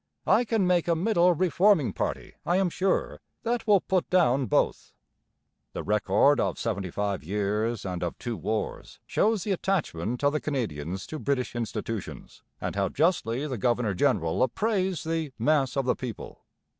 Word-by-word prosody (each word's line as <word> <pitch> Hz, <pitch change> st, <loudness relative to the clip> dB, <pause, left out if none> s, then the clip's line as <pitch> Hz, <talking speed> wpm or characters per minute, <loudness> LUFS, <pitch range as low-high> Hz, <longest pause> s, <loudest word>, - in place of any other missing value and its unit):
I 245 Hz, -, +4 dB
can 220 Hz, -4 st, +1 dB
make 180 Hz, -2 st, +2 dB
a 170 Hz, -, +3 dB
middle 180 Hz, 0 st, +3 dB
reforming 185 Hz, -, +3 dB
party, -, -, -3 dB
I 175 Hz, -, +1 dB
am 190 Hz, -2 st, +1 dB
sure, 190 Hz, +2 st, 0 dB, 0.2 s
that 235 Hz, 0 st, -1 dB
will 200 Hz, -3 st, +5 dB
put 185 Hz, -2 st, 0 dB
down 140 Hz, -8 st, +3 dB
both.' -, -, 0 dB, 0.8 s
The -, -, -4 dB
record 105 Hz, +7 st, +3 dB
of -, -, 0 dB
seventy 100 Hz, -5 st, -2 dB
five 100 Hz, 0 st, -2 dB
years 105 Hz, +5 st, -1 dB
and 90 Hz, -2 st, -3 dB
of 85 Hz, -1 st, -3 dB
two 120 Hz, -2 st, -4 dB
wars 110 Hz, 0 st, -4 dB
shows 215 Hz, -3 st, +1 dB
the 210 Hz, -, -2 dB
attachment 145 Hz, -, -1 dB
of 145 Hz, +1 st, +3 dB
the 150 Hz, -, -1 dB
Canadians 95 Hz, -, -3 dB
to 155 Hz, -, -6 dB
British 130 Hz, -5 st, -1 dB
institutions, 115 Hz, -2 st, -5 dB, 0.2 s
and -, -, -4 dB
how 100 Hz, -1 st, +1 dB
justly 145 Hz, -, +1 dB
the 130 Hz, -6 st, -4 dB
governor 120 Hz, -1 st, +1 dB
general 80 Hz, -2 st, +1 dB
appraised 190 Hz, -, 0 dB
the 160 Hz, -4 st, -2 dB
'mass 135 Hz, +2 st, +1 dB
of 135 Hz, -, +1 dB
the 125 Hz, -, +2 dB
people.' 120 Hz, -5 st, -8 dB
135 Hz, 165 wpm, -27 LUFS, -, 0.8 s, will